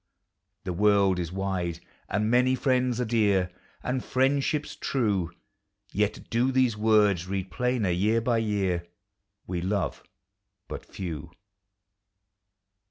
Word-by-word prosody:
The 90 -2 -3
world 100 -1 +3
is 85 -1 -3
wide, 90 -3 -2 0.3
and 105 +2 0
many 125 +1 +4
friends 125 -2 +1
are 125 - +1
dear, 100 -5 +2 0.3
And 125 0 -1
friendships 140 +3 +1
true; 100 -10 0 0.6
Yet 105 0 -1
do 120 +3 +2
these 130 -4 +3
words 105 -5 +3
read 95 -1 -3
plainer, 125 -1 0
year 105 +6 +2
by 115 0 +1
year: 95 -6 0 0.6
We 90 -1 -3
love 95 -3 -1 0.7
but - - -6
few. 85 -3 -6
105 Hz, 115 wpm, -27 LUFS, 90-125 Hz, 0.7 s, many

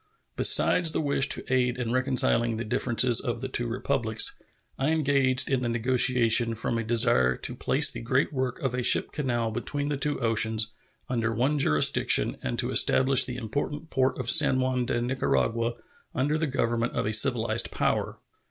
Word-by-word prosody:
Besides 170 -3 +4
the - - -1
wish 140 -2 +1
to - - -1
aid 125 -1 0
in 120 -2 -4
reconciling 125 -3 +1
the 115 - -4
differences 120 +2 +1
of 120 -3 -4
the 130 - -5
two 120 -2 -4
Republics, 115 -2 0 0.5
I 135 +3 0
engaged 140 -5 +1
in 135 -2 -1
the 120 - -2
negotiation 120 -1 +2
from 115 +1 -3
a - - -3
desire 65 - +2
to - - -5
place - - +2
the - - -8
great 130 +5 -1
work 130 -2 -3
of 135 -3 -2
a 125 - -2
ship - - +2
canal 120 -6 -2
between 145 +5 -3
the 145 - -2
two 145 +1 -3
oceans 110 -2 -1 0.3
under 115 -3 -2
one 130 +6 -1
jurisdiction 75 - +2
and 60 - -4
to - - -2
establish 130 0 +3
the 125 -1 -7
important 145 +7 -5
port 130 0 0
of 125 -1 +1
San 150 -5 +5
Juan 130 -1 -1
de 120 - -1
Nicaragua 120 -2 -1 0.4
under 145 +4 -1
the 160 0 -1
government 120 -3 -2
of - - -2
a 105 - -2
civilized 115 0 +2
power. - - -2
125 Hz, 180 wpm, -26 LUFS, 115-135 Hz, 0.5 s, San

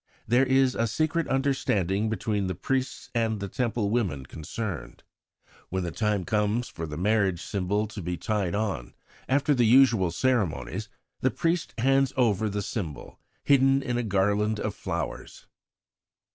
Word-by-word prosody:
There 125 +4 +4
is 130 -1 +4
a 115 - 0
secret 155 +8 0
understanding 110 -7 +1
between 105 -2 -1
the 95 - -2
priests 130 +7 -2
and 115 -3 0
the 100 - -3
Temple 110 -1 -1
women 90 - -1
concerned. 85 +6 -6 0.7
When 95 0 -2
the 85 - -3
time 105 -3 0
arrives 105 +3 +1
for 80 -1 -6
the 75 -1 -6
marriage 100 -2 +2
symbol 100 +2 -1
to 110 - -7
be 90 0 -3
tied 100 -2 -1
on, 100 - -3 0.3
after 140 +2 +3
the 120 -4 +3
usual 115 -7 +5
ceremonies 105 -3 -1 0.3
the - - +2
priest 165 0 -1
hands 135 +2 +3
over 110 -4 +2
the 105 0 -2
symbol 85 - -5 0.2
hidden 135 0 +4
in 125 -2 -1
a - - +1
garland 105 0 +1
of - - -2
flowers. - - -5
110 Hz, 150 wpm, -27 LUFS, 95-125 Hz, 0.7 s, usual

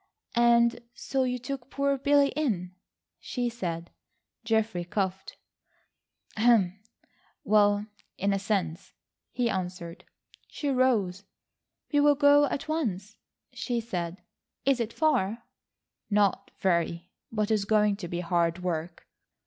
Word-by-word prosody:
"And 235 0 +4 0.2
so 270 - -2
you 250 0 -1
took 250 +1 -6
poor 280 0 +1
Billy 280 +1 +3
in?" 205 - -2 0.5
she 245 -1 -2
said. 170 -7 -5 0.5
Geoffrey 220 -5 0
coughed. 190 +1 -3 2.1
"Well, 205 -1 +3 0.3
in 200 +1 +1
a 195 - 0
sense," 190 -5 -2 0.4
he 245 -1 -1
answered. 180 -4 -4 0.4
She 290 - -4
rose. 225 -8 +1 0.7
"We'll 290 0 +5
go 290 0 +6
at 280 - -3
once," 215 - -2 0.4
she 240 -2 -2
said. 180 -5 -4 0.4
"Is 270 -2 +3
it 230 -1 -2
far?" 230 -7 +1 0.7
"Not 200 -1 +2
very, 170 -1 0 0.2
but 215 -1 -1
it - - +5
is 205 -2 +1
going 210 -1 +3
to 190 -4 -6
be 175 +1 -3
hard 170 -1 +1
work." 170 -1 -3
210 Hz, 115 wpm, -28 LUFS, 180-250 Hz, 2.1 s, go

